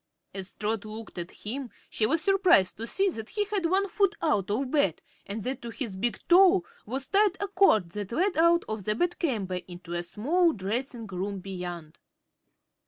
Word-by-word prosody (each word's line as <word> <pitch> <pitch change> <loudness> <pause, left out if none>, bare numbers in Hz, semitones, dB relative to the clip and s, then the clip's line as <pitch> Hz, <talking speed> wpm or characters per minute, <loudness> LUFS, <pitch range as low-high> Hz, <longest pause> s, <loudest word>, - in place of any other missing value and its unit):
As 190 0 -3
Trot 215 0 -2
looked 215 -3 -8
at 170 +1 -5
him 255 +4 -5 0.2
she 215 - +1
was 315 +4 +1
surprised 370 - +4
to 230 +2 -2
see 390 +8 +2
that 220 -6 -6
he 420 -1 -1
had 400 -4 0
one 385 +3 +2
foot 395 +1 +1
out 205 - +1
of 255 +5 -1
bed 240 - +2 0.3
and 205 +1 -4
that 260 +4 -3
to 235 - -6
his 230 -4 -4
big 235 +5 -1
toe 370 +1 +6 0.2
was 265 +4 -3
tied 405 -2 +3
a 405 - -1
cord 360 - +3
that 205 +1 -5
led 360 +9 +1
out 335 +1 +4
of 215 -3 -4
the 210 - +1
bedchamber 235 - -1
into 175 -1 -9
a 175 - -1
small 310 - +1
dressing 230 +4 -3
room 195 +1 -4
beyond. 180 -4 -7
230 Hz, 185 wpm, -28 LUFS, -, 0.3 s, toe